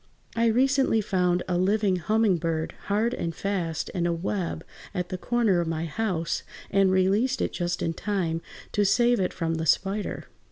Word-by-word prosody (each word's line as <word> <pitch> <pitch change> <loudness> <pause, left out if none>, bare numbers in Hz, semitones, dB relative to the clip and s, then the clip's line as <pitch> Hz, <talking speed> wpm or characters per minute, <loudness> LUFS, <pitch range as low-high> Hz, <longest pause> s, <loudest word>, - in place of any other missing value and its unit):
I 230 0 +3
recently 265 +1 +3
found 180 -3 +1
a 180 -1 0
living 195 0 +2
humming 210 +2 +2
bird 160 -1 -2
hard 215 +4 +1
and 170 -8 -3
fast 175 -5 -2
in 175 -2 -1
a - - +1
web 170 -1 -2 0.3
at 180 -1 -2
the 185 - -3
corner 225 -7 +2
of 170 - -2
my 165 0 -2
house, 170 -1 -1 0.3
and 195 -1 +4
released 200 +8 +2
it - - -1
just 175 -1 -2
in 165 - 0
time 170 -4 -2 0.3
to 205 - +2
save 240 +4 +3
it 185 - 0
from 165 -1 -2
the 160 0 -2
spider. 195 +6 0
185 Hz, 175 wpm, -26 LUFS, 170-215 Hz, 0.3 s, and